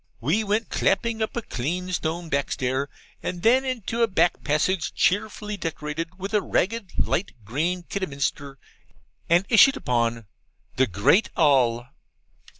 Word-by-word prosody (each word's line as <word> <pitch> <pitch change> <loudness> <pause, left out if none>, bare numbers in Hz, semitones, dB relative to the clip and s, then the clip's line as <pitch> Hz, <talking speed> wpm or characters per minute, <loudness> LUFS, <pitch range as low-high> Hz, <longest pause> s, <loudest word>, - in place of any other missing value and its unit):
We 155 - +1
went 215 +1 -1
clapping 225 +3 0
up 220 - -2
a 235 - -2
clean 180 +9 -3
stone 170 +1 -2
backstair, 140 -2 -1 0.3
and 175 -1 -5
then 255 +4 +5
into 235 -3 -3
a 230 - +5
back 175 -4 +1
passage 160 +4 0
cheerfully 210 +1 0
decorated 165 +1 -5
with 195 +2 -6
ragged 210 +1 0
light 195 - 0
green 165 - -1
Kidderminster, 140 -6 -3 0.7
and 175 +3 +4
issued 270 +4 +6
upon 115 - -1 0.5
'THE 130 0 +4
GREAT 100 - +3
ALL. 125 -6 +3
175 Hz, 130 wpm, -24 LUFS, 140-210 Hz, 0.7 s, issued